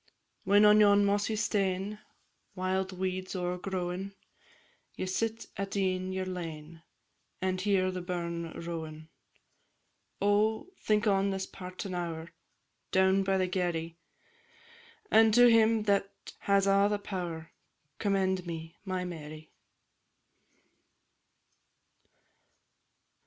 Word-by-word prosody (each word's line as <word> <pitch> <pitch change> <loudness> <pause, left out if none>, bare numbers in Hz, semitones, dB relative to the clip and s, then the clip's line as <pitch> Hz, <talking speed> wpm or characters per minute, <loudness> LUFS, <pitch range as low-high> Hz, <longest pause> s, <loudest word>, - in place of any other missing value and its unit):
When 205 +2 +6
on 210 0 +7
yon 205 -1 +6
mossy 205 +2 +1
stane, 205 -1 -1 0.6
Wild 185 0 -1
weeds 185 0 -3
o'ergrowin', 180 +1 -3 0.8
Ye - - -3
sit 225 +4 -2
at 195 0 -3
e'en 185 -1 0
your 190 0 -2
lane, 165 -3 -7 0.6
And 185 0 -1
hear 190 -2 +2
the 185 0 -4
burn 170 -2 -4
rowin'; 160 -2 -6 1.1
Oh! 215 - +1
think 215 +1 +1
on 200 -1 +3
this 190 -1 -2
partin' 185 +1 -7
hour, 170 -1 -4 0.6
Down 190 +1 +4
by 195 0 +1
the 185 - +2
Garry, 170 -2 -2 1.1
And 220 -1 +6
to 245 0 +8
Him 225 -1 +4
that 200 -1 +1 0.3
has 200 0 +2
a' 200 0 +4
the 210 - 0
pow'r, 175 -5 -5 0.5
Commend 190 -3 0
me, 165 -1 -7
my 185 -2 -3
Mary! 155 -2 -8
190 Hz, 105 wpm, -30 LUFS, 175-200 Hz, 1.1 s, to